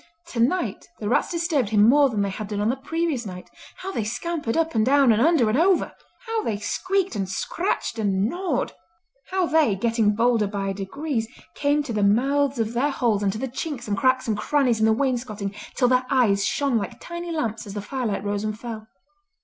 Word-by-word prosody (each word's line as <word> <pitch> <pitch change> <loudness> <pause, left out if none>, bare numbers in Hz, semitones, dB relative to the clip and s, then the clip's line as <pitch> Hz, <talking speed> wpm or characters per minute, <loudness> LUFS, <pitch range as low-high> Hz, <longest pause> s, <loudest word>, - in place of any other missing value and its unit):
Tonight 285 +4 -1
the 210 - -4
rats 230 - +2
disturbed 330 - 0
him 210 -1 +4
more 280 +3 +5
than 210 -4 0
they 200 - -1
had 210 +2 -5
done 205 -1 -3
on 210 +2 +1
the 250 - +1
previous 315 -1 -2
night. 180 -4 -9 0.2
How 385 - -6
they 230 - -2
scampered 240 +4 -2
up 325 0 +1
and 220 -2 +2
down 270 0 +5
and 220 +1 +3
under 305 -5 +4
and 215 - +1
over! 365 +2 +3 0.3
How 450 -1 -1
they 220 - -2
squeaked, 375 - -1
and 195 -2 -2
scratched, 340 - -2
and 200 -1 +1
gnawed! 360 +8 -2 0.6
How 375 -1 +1
they, 310 -10 +3
getting 220 0 +1
bolder 230 -2 +2
by 195 -1 -2
degrees, 225 +5 -3 0.3
came 290 +1 +1
to 245 - -5
the 210 - 0
mouths 270 +7 +2
of 225 0 -1
their 260 +5 +1
holes 235 -7 +1
and 200 -1 +1
to 215 - -5
the 265 - -3
chinks 260 -1 -5
and 205 - 0
cracks 255 +4 +2
and 220 - +1
crannies 245 +1 +1
in 220 - +4
the - - +4
wainscoting 225 -5 -1 0.2
till 250 - +3
their 255 0 +2
eyes 220 -7 +3
shone 275 -5 +1
like 200 - -6
tiny 345 0 -6
lamps 230 -9 -3
as 200 - -8
the - - -2
firelight 225 -5 -2
rose 205 0 -2
and 215 0 -3
fell. 225 -2 -7
240 Hz, 210 wpm, -24 LUFS, 210-290 Hz, 0.6 s, more